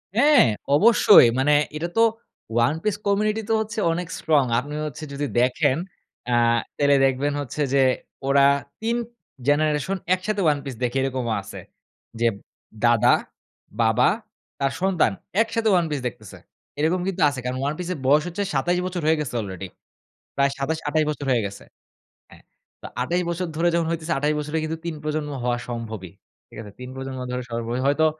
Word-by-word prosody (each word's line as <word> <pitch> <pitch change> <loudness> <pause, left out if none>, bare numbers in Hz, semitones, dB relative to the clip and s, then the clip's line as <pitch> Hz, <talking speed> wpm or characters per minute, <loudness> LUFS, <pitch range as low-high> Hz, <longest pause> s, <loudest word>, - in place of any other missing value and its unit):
হ্যাঁ, 285 - +6 0.3
অবশ্যই 210 - +7
মানে 145 +3 +3 0.2
এটা 160 +3 -2
তো - - +5 0.6
One 150 +6 0
Piece 210 -1 -1
community 210 +2 +1
তো - - +3
হচ্ছে 220 0 -4
অনেক 175 +1 -3
strong 150 -4 +2
আপনি 145 +4 -7
হচ্ছে 150 +1 -7
যদি 145 +1 -2
দেখেন 130 +3 +2 0.5
আ - - -1 0.5
তাহলে 145 0 +4
দেখবেন 135 +2 0
হচ্ছে 145 +2 -5
যে, 140 - +4 0.5
ওরা 140 0 +5 0.4
তিন 230 +1 0 0.5
generation 150 +5 +1 0.2
একসাথে 200 +3 -1
ওয়ান 150 -2 +3
পিস 135 -3 -5
দেখে 125 +2 0
এরকমও 130 -3 -1
আছে। 95 - -9 0.6
যে, 120 - +3 0.6
দাদা, 120 -2 +5 0.7
বাবা, 115 +2 +4 0.5
তার 135 -1 +1
সন্তান 190 -3 +2 0.3
একসাথে 225 -1 0
ওয়ান 175 -2 +3
পিস 145 - -1
দেখতেছে। 115 - -10 0.4
এরকম 165 +4 +1
কিন্তু 195 -2 -2
আছে 140 -2 -5
কারণ 125 +1 -2
ওয়ান 145 - 0
পিস 180 - -5
এর 165 - -8
বয়স 150 +2 +5
হচ্ছে 185 +4 -3
২৭ 175 +6 +1
বছর 180 -1 -3
হয়ে 160 +1 +3
গেছে 150 -5 -4
আলরেডি 95 -2 -6 0.7
প্রায় 140 0 +3
২৭ 155 +4 -1
২৮ 155 +1 +2
বছর 150 -1 -5
হয়ে 120 -3 +2
গেছে। 100 0 -9 0.7
হ্যাঁ, - - -17 0.4
তো - - -11 0.2
২৮ 175 +8 0
বছর 170 +2 -2
ধরে 165 +2 +1
যখন 170 -1 +1
হইতেছে 165 0 -2
২৮ 150 +2 +1
বছরে 150 +2 -3
কিন্তু 160 +1 -3
তিন 170 -2 -3
প্রজন্ম 150 -1 -2
হওয়া 120 0 0
সম্ভবই 110 -6 -6 0.4
ঠিক - - -14
আছে? 105 -2 -10
তিন 125 0 -7
প্রজন্ম 135 0 -6
ধরে 125 0 -2
সবার 115 0 -3 0.2
হয়তো, 145 +3 +3
150 Hz, 170 wpm, -23 LUFS, 130-175 Hz, 0.7 s, অবশ্যই